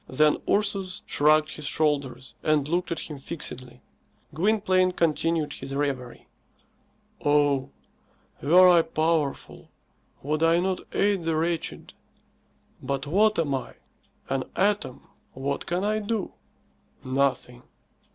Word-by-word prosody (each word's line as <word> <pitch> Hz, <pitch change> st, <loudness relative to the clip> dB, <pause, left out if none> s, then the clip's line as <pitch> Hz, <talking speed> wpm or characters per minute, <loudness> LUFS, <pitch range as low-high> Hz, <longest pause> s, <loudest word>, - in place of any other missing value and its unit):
Then 150 Hz, +3 st, +3 dB
Ursus 200 Hz, -3 st, -1 dB
shrugged 155 Hz, +1 st, +3 dB
his 150 Hz, -2 st, -6 dB
shoulders 140 Hz, -5 st, -1 dB
and 150 Hz, -2 st, +1 dB
looked 175 Hz, +3 st, -1 dB
at 165 Hz, -, -2 dB
him 150 Hz, -3 st, -8 dB
fixedly. 130 Hz, -5 st, -7 dB, 0.5 s
Gwynplaine 185 Hz, +1 st, +2 dB
continued 165 Hz, -2 st, 0 dB
his 135 Hz, -, -7 dB
reverie. 135 Hz, -4 st, -3 dB, 1.0 s
"Oh; 145 Hz, -2 st, +2 dB, 0.7 s
were 180 Hz, +5 st, +6 dB
I 175 Hz, -2 st, +6 dB
powerful, 160 Hz, -3 st, -2 dB, 0.5 s
would 150 Hz, +3 st, -1 dB
I 165 Hz, +1 st, +4 dB
not 185 Hz, +1 st, -1 dB
aid 200 Hz, -3 st, +1 dB
the 165 Hz, -1 st, 0 dB
wretched? 165 Hz, +1 st, -2 dB, 0.9 s
But 135 Hz, +1 st, -3 dB
what 210 Hz, +8 st, +3 dB
am 155 Hz, -4 st, 0 dB
I? 130 Hz, -, -4 dB, 0.5 s
An 135 Hz, -1 st, -1 dB
atom. 200 Hz, -9 st, 0 dB, 0.3 s
What 140 Hz, +2 st, -3 dB
can 175 Hz, +2 st, -1 dB
I 215 Hz, +1 st, +1 dB
do? 215 Hz, -1 st, -3 dB, 0.7 s
Nothing." 130 Hz, -2 st, -1 dB
155 Hz, 115 wpm, -26 LUFS, 140-180 Hz, 1.0 s, were